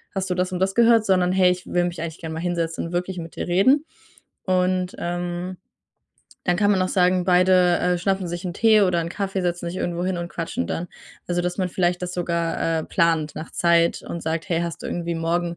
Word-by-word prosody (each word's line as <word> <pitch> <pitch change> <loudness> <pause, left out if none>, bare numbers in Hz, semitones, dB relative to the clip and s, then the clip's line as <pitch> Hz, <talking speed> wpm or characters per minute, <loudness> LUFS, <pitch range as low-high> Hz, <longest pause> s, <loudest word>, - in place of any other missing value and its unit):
hast 190 0 -2
du - - +1
das 180 +1 -1
und 185 - -2
das 190 +1 +1
gehört?", 230 -2 +5
sondern: 185 -2 +3
„Hey, 185 -1 +4
ich 180 0 -4
will 175 0 +1
mich 175 -2 -4
eigentlich 165 -1 -5
gern 160 -1 -6
mal 160 - -4
hinsetzen 165 -1 -2
und - - -9
wirklich 180 +1 -2
mit 165 -1 -8
dir - - -4
reden.“ 260 - +3 0.6
Und, 185 0 +1
ähm, 175 +1 -3 0.9
dann 175 - +2
kann 205 +2 +3
man 190 - +1
auch 185 - 0
sagen, 180 -1 +2
beide, 180 -1 +4
äh, 180 0 +1
schnappen 190 0 -1
sich 175 +2 -5
'n 175 - -4
Tee 220 0 +5
oder 180 -3 +2
'n 165 - -3
Kaffee, 195 0 -2
setzen 175 -1 -2
sich 175 - -6
irgendwo 175 0 -2
hin 185 -1 -1
und 175 0 -4
quatschen 165 - -3
dann. 175 - -3 0.4
Also, 175 0 0
dass 180 +2 -3
man 185 -2 0
vielleicht 175 0 0
das 180 0 -4
sogar, 170 -1 -1
äh, - - -6
plant 160 -2 +1
nach 160 - -7
Zeit 170 -1 +2
und 170 - -6
sagt: 160 0 -3
„Hey, 170 -1 +1
hast 170 -1 -5
du - - -5
irgendwie 170 -1 -3
morgen 170 +1 -1
175 Hz, 230 wpm, -23 LUFS, 170-185 Hz, 0.9 s, gehört